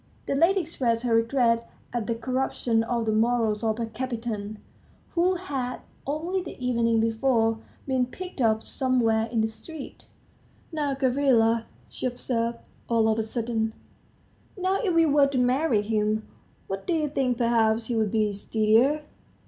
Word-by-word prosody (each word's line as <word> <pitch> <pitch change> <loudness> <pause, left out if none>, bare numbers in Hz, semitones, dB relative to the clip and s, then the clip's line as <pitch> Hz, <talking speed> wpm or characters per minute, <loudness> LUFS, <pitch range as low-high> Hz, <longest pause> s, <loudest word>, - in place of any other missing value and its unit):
The - - -1
lady 345 +7 +4
expressed 250 -8 -1
her 240 -2 +1
regret 230 0 +2 0.2
at 235 -3 -2
the 230 - 0
corruption 245 -1 0
of 235 0 -1
the 220 - +1
morals 225 -1 +1
of 220 -1 +1 0.2
Kapiton, 225 -4 -4 0.5
who 360 +2 +2
had, 270 -9 -4 0.3
only 335 +6 -1
the 355 - -8
evening 235 -2 +1
before, 225 0 +2 0.3
been 260 -2 +1
picked 360 +1 -7
up 220 -1 +2
somewhere 230 -4 +1
in 230 -1 0
the 220 - +2
street. 280 +7 -10 0.7
"Now, 295 -4 -1
Gavrila," 250 -4 +3 0.2
she - - -4
observed, 235 -1 -1 0.3
all 230 -2 +3
of 220 0 +1
a - - +3
sudden, 225 0 -2 0.8
"now, 375 +2 0
if 405 -6 +1
we 330 0 +5
were 290 -2 +4
to 275 -1 -2
marry 250 -2 +2
him, 215 0 0 0.4
what 195 0 -5
do 355 - +1
you 310 -2 +1
think, 265 -4 0
perhaps 230 -2 +2
he 240 - -2
would 220 -3 +1
be 215 -2 +1
steadier?" 225 +8 +2
235 Hz, 155 wpm, -26 LUFS, 225-275 Hz, 0.8 s, we